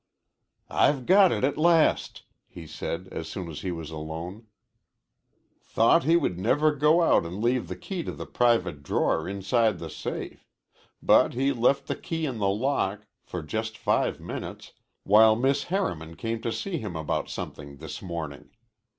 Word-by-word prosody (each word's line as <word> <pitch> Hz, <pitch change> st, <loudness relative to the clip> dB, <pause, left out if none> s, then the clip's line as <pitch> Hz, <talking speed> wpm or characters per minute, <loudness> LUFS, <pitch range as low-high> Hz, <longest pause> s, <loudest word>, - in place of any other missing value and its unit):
"I've 135 Hz, -4 st, +2 dB
got 190 Hz, 0 st, +6 dB
it -, -, -1 dB
at 140 Hz, +2 st, +1 dB
last," 165 Hz, -1 st, +3 dB, 0.2 s
he 85 Hz, -, -11 dB
said 85 Hz, +3 st, -5 dB
as 80 Hz, -, -5 dB
soon 95 Hz, -3 st, -5 dB
as 75 Hz, -, -7 dB
he 95 Hz, -, -3 dB
was 80 Hz, -2 st, -6 dB
alone. 80 Hz, +7 st, -7 dB, 1.1 s
"Thought 115 Hz, +9 st, +3 dB
he 165 Hz, +2 st, +4 dB
never 145 Hz, -, +2 dB
would 150 Hz, -, -9 dB
go 155 Hz, +4 st, +5 dB
out -, -, +4 dB
and 85 Hz, +4 st, -6 dB
leave 120 Hz, -2 st, +1 dB
the 90 Hz, -, -5 dB
key 180 Hz, -, -5 dB
to -, -, -3 dB
the -, -, -7 dB
private 105 Hz, -11 st, +1 dB
drawer 70 Hz, -, 0 dB
inside 100 Hz, +2 st, +1 dB
the 80 Hz, -2 st, -7 dB
safe. -, -, -6 dB, 0.5 s
But -, -, +4 dB
he 135 Hz, +3 st, +1 dB
left 135 Hz, +4 st, +2 dB
the -, -, -2 dB
key 165 Hz, -1 st, -4 dB
in 130 Hz, -6 st, -4 dB
the 100 Hz, -1 st, +2 dB
lock 105 Hz, -2 st, -1 dB, 0.2 s
for 90 Hz, -3 st, -6 dB
just 110 Hz, +6 st, -4 dB
five -, -, 0 dB
minutes -, -, -7 dB, 0.3 s
while 110 Hz, +2 st, +6 dB
Miss 135 Hz, +4 st, +1 dB
Harriman 85 Hz, -, -2 dB
came 115 Hz, +3 st, -3 dB
to 115 Hz, -, -2 dB
see 175 Hz, -, -3 dB
him 105 Hz, -8 st, -6 dB
about 80 Hz, -2 st, -2 dB
something 70 Hz, -1 st, -7 dB
this 80 Hz, +1 st, -8 dB
morning. 80 Hz, -6 st, -6 dB
110 Hz, 170 wpm, -26 LUFS, 85-140 Hz, 1.1 s, got